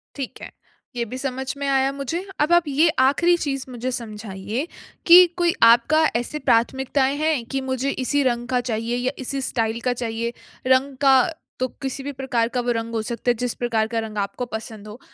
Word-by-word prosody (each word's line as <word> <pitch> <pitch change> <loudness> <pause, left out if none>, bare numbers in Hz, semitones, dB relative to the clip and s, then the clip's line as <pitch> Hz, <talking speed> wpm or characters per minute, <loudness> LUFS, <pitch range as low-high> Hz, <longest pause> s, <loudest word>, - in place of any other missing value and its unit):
ठीक 275 -3 -6
है। - - -8 0.4
ये 240 - -1
भी 255 - -4
समझ 265 0 -3
में 280 0 -3
आया 270 0 +2
मुझे। 280 +6 -4 0.2
अब 300 +3 +2
आप 345 0 +5
ये 295 +4 +3
आखरी 335 +6 +4
चीज़ 275 -5 -3
मुझे 250 +1 -4
समझाइए 215 - -5 0.4
कि 355 +1 +10
कोई 345 -1 +2
आपका 235 +7 +5
ऐसे 240 +6 -2
प्राथमिकताएँ 265 +3 +2
हैं 305 -4 0
कि 270 - -1
मुझे 260 +1 -1
इसी 285 +3 +1
रंग 240 -2 0
का 250 -1 +1
चाहिए 230 +2 -1
या 250 +1 -1
इसी 270 +1 -2
स्टाइल 230 -3 -1
का 250 - +2
चाहिए? 235 -1 -3 0.3
रंग 260 +1 +3
का 270 -1 +6 0.4
तो 255 - +1
किसी 270 0 -4
भी 285 - -4
प्रकार 255 -4 -1
का 250 - +2
वो 245 0 -1
रंग 230 0 -4
हो 225 - 0
सकता 240 0 -2
है, - - +2
जिस 245 +1 -2
प्रकार 230 -3 0
का 230 0 -2
रंग 220 -1 -6
आपको 205 +5 -2
पसंद 220 -1 -7
हो। 210 +3 -10
255 Hz, 200 wpm, -22 LUFS, 230-275 Hz, 0.4 s, कि